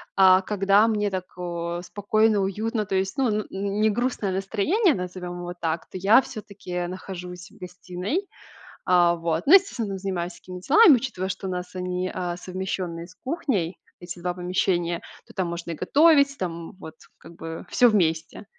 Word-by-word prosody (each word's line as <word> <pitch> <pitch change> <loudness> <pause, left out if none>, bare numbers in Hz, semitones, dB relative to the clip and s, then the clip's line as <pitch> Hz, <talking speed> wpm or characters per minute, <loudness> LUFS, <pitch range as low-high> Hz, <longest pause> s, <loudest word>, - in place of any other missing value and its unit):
А 190 -1 +6
когда 200 +2 +3
мне 210 -2 0
так, 185 -1 -3
э, 170 -1 -4
спокойно, 215 +2 +1
уютно, 215 +3 -1
то 190 - -1
есть, 190 +6 -1
ну, 260 -3 +3
н 210 0 -1
не 200 +2 0
грустное 240 -3 -1
настроение, 225 - +1
назовем 180 -1 -6
его 175 0 -5
так, 165 0 -2
то - - -7
я 205 +7 +6
всё-таки 185 -5 -6
нахожусь 180 -1 -8
в - - -19
гостиной. 180 - -4 0.6
Э, 175 -1 +5
вот. 165 0 -2
Но, 310 - +7
естественно, 360 - +3
там 195 - -4
занимаюсь 185 -2 -3
всякими 180 +1 -10
делами, 315 - +7
учитывая, 225 -7 -3
что 190 0 -5
у - - -3
нас 180 0 -5
они, 180 0 -2
э, 175 -1 -3
совмещенные 180 -2 -4
с 180 - -17
кухней, 240 - -2 0.2
эти 175 0 -8
2 180 0 -2
помещения, 175 -1 0 0.3
то - - -15
там 185 - -1
можно 170 0 -5
и - - -2
готовить, 280 - +4
там 170 -2 -5
вот 160 -4 -10 0.2
как 165 - -14
бы 165 -1 -7
всё 245 - +5
вместе. 165 -5 0
185 Hz, 175 wpm, -25 LUFS, 175-210 Hz, 0.6 s, Но